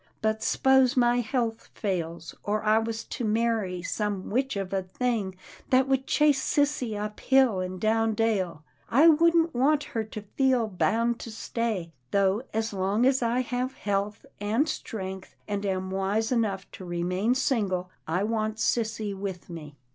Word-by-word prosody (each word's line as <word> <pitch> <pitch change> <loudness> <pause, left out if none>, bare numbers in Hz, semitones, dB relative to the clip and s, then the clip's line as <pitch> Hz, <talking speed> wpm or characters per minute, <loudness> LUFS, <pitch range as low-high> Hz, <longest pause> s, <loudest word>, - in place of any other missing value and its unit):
But 220 0 0
s'pose 265 -1 +3
my 240 0 +4
health 230 -1 -2
fails, 170 -5 -3
or 210 +1 -1
I 215 +1 +4
was 225 0 -3
to - - -6
marry 215 -5 0
some 205 -1 -2
witch 265 +3 0
of 195 -1 -4
a 195 - +1
thing 200 0 -2 0.3
that 260 +1 +4
would 265 0 +1
chase 295 -3 +3
sissy 280 -8 0
up 210 0 -5
hill 265 -7 +4
and 185 0 -4
down 220 +1 +2
dale 195 -8 0
— - - -38
I 285 +8 +6
wouldn't 330 +1 +5
want 285 +4 +3
her 225 - 0
to 215 -1 -8
feel 260 -4 +3
bound 230 +4 +1
to - - -7
stay, 220 -5 -3 0.2
though 200 - +2
as 220 0 -2
long 200 +5 +1
as 265 0 +3
I 240 +1 +1
have 255 +1 -3
health 205 +1 -2
and 220 +9 +1
strength, 190 -8 -5
and 205 -1 -2
am 190 -1 -2
wise 195 +4 0
enough 210 -6 0
to - - -10
remain 180 +6 0
single, 200 -9 0 0.2
I 175 +5 0
want 215 0 -1
sissy 220 -2 0
with 190 -2 -6
me." 150 -3 -8
220 Hz, 165 wpm, -27 LUFS, 195-245 Hz, 0.3 s, I